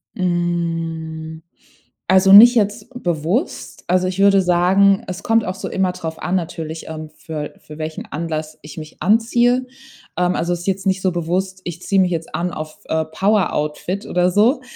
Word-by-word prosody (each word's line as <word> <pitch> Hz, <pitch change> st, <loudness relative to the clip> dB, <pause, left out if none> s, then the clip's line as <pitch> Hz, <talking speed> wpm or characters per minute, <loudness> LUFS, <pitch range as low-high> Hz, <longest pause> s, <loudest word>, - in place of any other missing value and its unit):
Hm, 165 Hz, -3 st, -3 dB, 0.7 s
also 190 Hz, +1 st, +5 dB
nicht 235 Hz, +5 st, +10 dB
jetzt 210 Hz, +1 st, 0 dB
bewusst. 175 Hz, -, -2 dB
Also, 185 Hz, +1 st, +2 dB
ich 185 Hz, +1 st, -4 dB
würde 195 Hz, -1 st, +5 dB
sagen, 185 Hz, +3 st, +3 dB
es 185 Hz, 0 st, -6 dB
kommt 225 Hz, 0 st, +2 dB
auch 185 Hz, +1 st, -4 dB
so -, -, -6 dB
immer 190 Hz, -1 st, 0 dB
drauf 160 Hz, -3 st, -7 dB
an, 180 Hz, +1 st, -1 dB
natürlich, 165 Hz, -2 st, -4 dB
ähm, 155 Hz, -1 st, -7 dB
für 155 Hz, -2 st, -6 dB
für 150 Hz, -, -13 dB
welchen 155 Hz, 0 st, -5 dB
Anlass 155 Hz, 0 st, -5 dB
ich 150 Hz, 0 st, -12 dB
mich 155 Hz, -1 st, -10 dB
anziehe, 240 Hz, +4 st, +2 dB, 0.5 s
ähm, 180 Hz, 0 st, +1 dB
also, 175 Hz, +1 st, -1 dB
ist 175 Hz, +2 st, -6 dB
jetzt 195 Hz, 0 st, -1 dB
nicht 190 Hz, 0 st, +1 dB
so 185 Hz, -1 st, +1 dB
bewusst: 185 Hz, +3 st, -2 dB
„Ich 175 Hz, 0 st, -7 dB
ziehe 195 Hz, -1 st, +1 dB
mich 180 Hz, -1 st, +3 dB
jetzt 165 Hz, -1 st, -4 dB
an 175 Hz, +1 st, -2 dB
auf, 155 Hz, -1 st, -7 dB
äh, 160 Hz, 0 st, 0 dB
Power-Outfit“ 180 Hz, 0 st, -1 dB
oder 180 Hz, 0 st, +1 dB
so. 230 Hz, -, +3 dB
180 Hz, 170 wpm, -19 LUFS, 160-195 Hz, 0.7 s, nicht